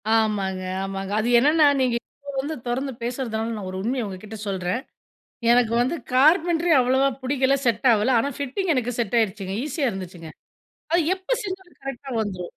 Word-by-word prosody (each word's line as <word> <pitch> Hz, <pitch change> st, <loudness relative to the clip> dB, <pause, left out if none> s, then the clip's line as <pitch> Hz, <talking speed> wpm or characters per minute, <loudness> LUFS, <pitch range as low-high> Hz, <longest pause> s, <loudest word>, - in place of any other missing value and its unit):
ஆமாங்க 205 Hz, -4 st, +1 dB, 0.2 s
ஆமாங்க. 195 Hz, 0 st, -4 dB
அது 220 Hz, -, 0 dB
என்னென்னா 300 Hz, +4 st, +5 dB, 0.2 s
நீங்க 250 Hz, -2 st, +2 dB
இப்ப 285 Hz, +3 st, -12 dB
வந்து 305 Hz, +3 st, -4 dB
தொறந்து 265 Hz, +3 st, -1 dB
பேசுறதுனால 230 Hz, -2 st, -2 dB
நான் 205 Hz, -3 st, -6 dB
ஒரு 185 Hz, -, -5 dB
உண்மைய 240 Hz, +3 st, -1 dB
உங்ககிட்ட 200 Hz, +3 st, -8 dB
சொல்றேன். 190 Hz, +3 st, -2 dB, 0.7 s
எனக்கு 240 Hz, -2 st, +3 dB
வந்து 255 Hz, +7 st, 0 dB, 0.2 s
கார்ப்பென்ட்ரி 330 Hz, +5 st, +4 dB
அவ்வளோவா 260 Hz, +2 st, +3 dB
பிடிக்கல. 265 Hz, +1 st, +2 dB
செட் 235 Hz, +1 st, +2 dB
ஆவல. 215 Hz, +2 st, +2 dB
ஆனா 275 Hz, -, 0 dB
ஃபிட்டிங் 310 Hz, +7 st, -1 dB
எனக்கு 245 Hz, -1 st, 0 dB
செட் 235 Hz, -1 st, 0 dB
ஆய்டுச்சுங்க. 195 Hz, -3 st, -2 dB
ஈஸியா 295 Hz, -1 st, -1 dB
இருந்துச்சுங்க. 180 Hz, -4 st, -8 dB, 0.6 s
அது 345 Hz, -, +5 dB
எப்போ 380 Hz, +6 st, -2 dB
செஞ்சாலும் 375 Hz, -6 st, -7 dB
கரெக்ட்டா 270 Hz, 0 st, -6 dB
வந்துடும். 185 Hz, -4 st, -5 dB
245 Hz, 160 wpm, -24 LUFS, 205-280 Hz, 0.7 s, என்னென்னா